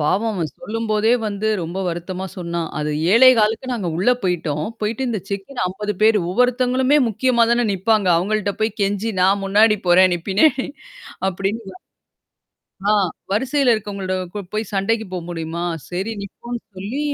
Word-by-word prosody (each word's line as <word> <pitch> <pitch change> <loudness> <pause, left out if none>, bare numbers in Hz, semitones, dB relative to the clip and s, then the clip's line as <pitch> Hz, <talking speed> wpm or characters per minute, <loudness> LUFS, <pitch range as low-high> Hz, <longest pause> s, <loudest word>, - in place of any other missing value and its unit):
பாவம் 195 +9 +1
அவன் 165 -6 -2
சொல்லும்போதே 225 -1 0
வந்து 210 +1 -2
ரொம்ப 170 +3 -5
வருத்தமா 180 +2 -4
சொன்னான். 170 -2 -3
அது 150 0 -1 0.2
7:15க்கு 235 0 +5
நாங்க 205 -8 -2
உள்ள 195 +8 +3
போய்ட்டோம். 160 -5 -1 0.2
போயிட்டு 225 +5 -1
இந்த 220 -5 -2
செக்கின் 200 +3 -3
50 210 +3 -3
பேரு 220 -1 +5
ஒவ்வொருத்தவங்களுமே 255 +5 +2
முக்கியமா 235 +2 +2
தானே 240 0 +2
நிப்பாங்க. 200 +1 +1
அவங்கள்ட்ட 200 +3 0
போய் 220 -1 -1
கெஞ்சி 205 +3 0
நான் 195 +2 +3
முன்னாடி 210 +2 +4
போறேன் 185 +1 +6
நீ - - -2
பின்னாடி 265 +7 +3 0.6
அப்டின்னு 195 - -4 1.1
ஆ - - +5 0.4
வரிசையில 260 +4 +2
இருக்கவங்களட 200 -3 -4 0.4
போய் 215 -1 -3
சண்டைக்கு 220 +3 0
போ 185 - -2
முடியுமா? 165 0 -4 0.3
சரி 190 +5 -3
நிப்போன்னு 235 +4 -7 0.2
சொல்லி 205 +9 -4
210 Hz, 140 wpm, -20 LUFS, 185-230 Hz, 1.1 s, போறேன்